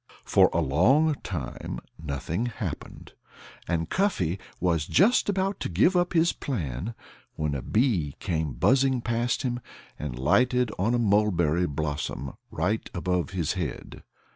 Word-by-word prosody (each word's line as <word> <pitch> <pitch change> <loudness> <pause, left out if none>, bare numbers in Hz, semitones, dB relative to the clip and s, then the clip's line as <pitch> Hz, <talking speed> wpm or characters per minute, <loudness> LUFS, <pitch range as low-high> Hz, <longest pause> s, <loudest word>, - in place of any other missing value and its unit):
For - - +5
a 85 - +1
long 120 - +4
time 80 -9 -5 0.3
nothing 80 - -2
happened. 120 - -6 0.5
And 85 -2 0
Cuffy 100 - 0 0.2
was 85 -4 +1
just 205 +5 +4
about 195 0 0
to - - -3
give 105 - +3
up 175 0 +2
his 170 0 +3
plan 95 - -4 0.4
when 75 -2 -1
a 70 - -2
bee 100 - +1
came 80 -7 -2
buzzing 130 - +3
past 120 +3 0
him 120 -2 -1 0.4
and 70 -5 -4
lighted 125 - +2
on 110 +6 +2
a - - +3
mulberry 95 -7 +2
blossom 75 -2 -3 0.2
right 100 +8 -1
above 90 0 0
his 90 -4 -1
head. - - -5
95 Hz, 140 wpm, -27 LUFS, 80-125 Hz, 0.5 s, For